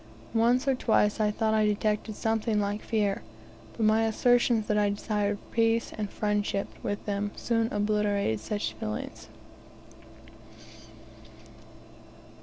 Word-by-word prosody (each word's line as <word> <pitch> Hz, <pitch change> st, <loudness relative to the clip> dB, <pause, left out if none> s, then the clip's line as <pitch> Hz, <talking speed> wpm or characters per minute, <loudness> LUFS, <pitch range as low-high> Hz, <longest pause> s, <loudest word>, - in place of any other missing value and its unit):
Once 240 Hz, +4 st, +3 dB
or 270 Hz, -, +4 dB
twice 220 Hz, -4 st, +2 dB
I 215 Hz, -1 st, +3 dB
thought 220 Hz, +1 st, 0 dB
I 215 Hz, 0 st, +3 dB
detected 210 Hz, +1 st, 0 dB
something 220 Hz, 0 st, 0 dB
like 205 Hz, +1 st, -1 dB
fear, 205 Hz, -3 st, 0 dB, 0.6 s
but 225 Hz, -, -1 dB
my 220 Hz, +1 st, +4 dB
assertions 235 Hz, 0 st, +3 dB
that 210 Hz, -, 0 dB
I 205 Hz, -1 st, +3 dB
desired 205 Hz, 0 st, -1 dB
peace 230 Hz, 0 st, +1 dB
and 210 Hz, -2 st, -3 dB
friendship 205 Hz, -1 st, -1 dB
with 205 Hz, 0 st, -3 dB
them 205 Hz, 0 st, -1 dB
soon 230 Hz, -1 st, 0 dB
obliterated 205 Hz, -, 0 dB
all -, -, -15 dB
such 205 Hz, -, -2 dB
feelings. 110 Hz, +1 st, -6 dB
210 Hz, 125 wpm, -28 LUFS, 205-225 Hz, 0.6 s, or